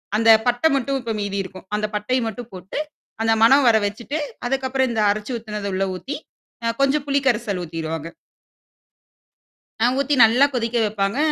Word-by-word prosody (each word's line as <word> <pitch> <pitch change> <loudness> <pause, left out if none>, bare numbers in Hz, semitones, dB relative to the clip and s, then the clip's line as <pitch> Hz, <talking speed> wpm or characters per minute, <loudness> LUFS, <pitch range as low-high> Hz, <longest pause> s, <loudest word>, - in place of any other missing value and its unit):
அந்த 225 +1 +5 0.2
பட்ட 245 +5 +1
மட்டும் 275 +1 0
இப்ப 230 -2 -3
மீதி 200 -1 -3
இருக்கும். 185 0 -11
அந்த 210 0 -1
பட்டைய 230 +5 0
மட்டும் 230 +2 -7
போட்டு, 185 +5 -8 0.4
அந்த 225 0 +3
மணம் 270 +3 +6
வர 225 - +6
வச்சுட்டு, 235 +9 -4 0.3
அதுக்கப்புறம் 265 0 0
இந்த 225 -2 0
அரைச்சு 210 +4 -4
ஊத்துனத 210 -2 -5
உள்ள 195 +1 +1
ஊத்தி, 275 +10 -5 0.5
அ 230 - +1
கொஞ்சம் 275 +1 +2
புளி 280 0 +1
கரைசல் 215 -6 0
ஊத்திருவாங்க. 165 -1 -5 1.8
ஆ - - +5
ஊத்தி 280 +1 +1
நல்லா 240 +5 +5
கொதிக்க 235 -1 -1
வைப்பாங்க. 205 +2 -1
225 Hz, 160 wpm, -22 LUFS, 205-260 Hz, 1.8 s, மணம்